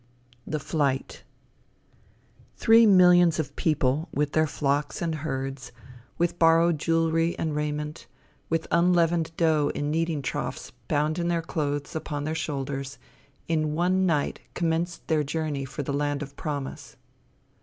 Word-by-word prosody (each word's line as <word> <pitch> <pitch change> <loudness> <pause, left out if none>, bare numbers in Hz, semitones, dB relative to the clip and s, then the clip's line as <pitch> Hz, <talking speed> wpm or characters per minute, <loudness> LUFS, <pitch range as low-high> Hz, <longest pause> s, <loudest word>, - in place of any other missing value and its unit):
THE 155 - -1
FLIGHT 140 -2 -2 1.3
Three 225 0 +6
millions 180 -3 +6
of 145 -3 -3
people, 155 0 0
with 145 0 -1
their 155 0 +2
flocks 145 0 -1
and 165 -2 -1
herds, 135 -3 -4 0.5
with 175 0 0
borrowed 165 -1 +4
jewelry 165 +1 +1
and 155 -2 -2
raiment, 150 0 -3 0.4
with 165 0 0
unleavened 170 -1 +3
dough 155 -3 +2
in 145 0 -2
kneading 160 -2 -1
troughs - - -4 0.2
bound 150 +3 0
in 170 - -1
their 170 -1 0
clothes 145 -2 -3
upon 150 -2 -3
their 155 +2 -2
shoulders, 140 -3 -4 0.5
in 155 -2 0
one 185 +3 +2
night 150 -4 0 0.2
commenced 170 0 -1
their 155 -2 +2
journey 150 -2 -3
for 135 +2 -5
the 140 - -3
land 145 0 -1
of 140 0 -11
promise. 145 -3 -5
155 Hz, 135 wpm, -26 LUFS, 145-165 Hz, 1.3 s, Three